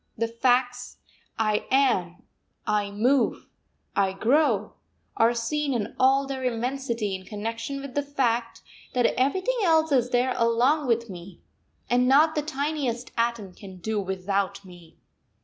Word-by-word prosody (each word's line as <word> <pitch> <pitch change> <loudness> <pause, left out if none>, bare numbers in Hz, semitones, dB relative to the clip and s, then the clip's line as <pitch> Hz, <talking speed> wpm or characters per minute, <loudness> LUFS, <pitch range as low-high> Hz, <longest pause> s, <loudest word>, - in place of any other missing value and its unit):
The 230 +1 0
facts: 245 +1 0 0.4
I 215 -1 0
am, 235 -11 +1 0.4
I 210 -1 0
move, 245 +6 +1 0.5
I 195 -1 +2
grow, 270 +10 +1 0.4
are 230 +1 +3
seen 275 +4 -1
in 220 -2 -3
all 270 +1 +4
their 270 -1 -5
immensity 240 -3 -2
in 190 0 -5
connection 230 +7 -5
with 275 -2 -8
the 285 - +1
fact 245 -5 -1 0.3
that 245 -1 +3
everything 375 - 0
else 320 -3 +3
is 250 -3 +2
there 250 +1 +1
along 250 +5 +2
with 235 -1 +1
me, 180 -2 -10 0.5
and 250 +1 +2
not 300 +4 +5
the 300 - 0
tiniest 285 -5 -3
atom 230 -5 -1
can 190 0 -12
do 215 +4 -2
without 195 +1 -2
me. 175 -3 -15
240 Hz, 140 wpm, -25 LUFS, 210-275 Hz, 0.5 s, not